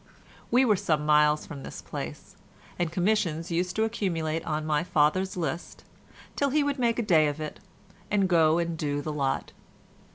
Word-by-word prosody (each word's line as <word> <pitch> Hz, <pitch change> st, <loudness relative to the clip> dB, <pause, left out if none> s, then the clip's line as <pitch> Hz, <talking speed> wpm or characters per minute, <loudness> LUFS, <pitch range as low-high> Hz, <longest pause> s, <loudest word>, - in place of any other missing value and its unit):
We 250 Hz, +3 st, +4 dB
were 210 Hz, -5 st, +3 dB
some 155 Hz, -4 st, 0 dB
miles 150 Hz, 0 st, +4 dB
from 145 Hz, -4 st, -8 dB
this -, -, -8 dB
place, -, -, -7 dB, 0.4 s
and 175 Hz, -2 st, 0 dB
commissions 175 Hz, -3 st, 0 dB
used 180 Hz, +2 st, -1 dB
to 220 Hz, -, +2 dB
accumulate 170 Hz, -8 st, -1 dB
on 155 Hz, -1 st, -1 dB
my 150 Hz, 0 st, +1 dB
father's 180 Hz, +4 st, +1 dB
list 170 Hz, 0 st, -4 dB, 0.5 s
till 280 Hz, -, +1 dB
he 295 Hz, +2 st, +2 dB
would 285 Hz, -1 st, -1 dB
make 235 Hz, -2 st, +1 dB
a 240 Hz, -, 0 dB
day 160 Hz, -7 st, +4 dB
of 145 Hz, +1 st, -3 dB
it 155 Hz, -1 st, -6 dB, 0.5 s
and 200 Hz, -2 st, +2 dB
go 165 Hz, -3 st, +4 dB
and 170 Hz, -1 st, -1 dB
do 145 Hz, -2 st, -2 dB
the 155 Hz, -, -3 dB
lot. 135 Hz, -2 st, -1 dB
165 Hz, 175 wpm, -27 LUFS, 155-200 Hz, 0.5 s, We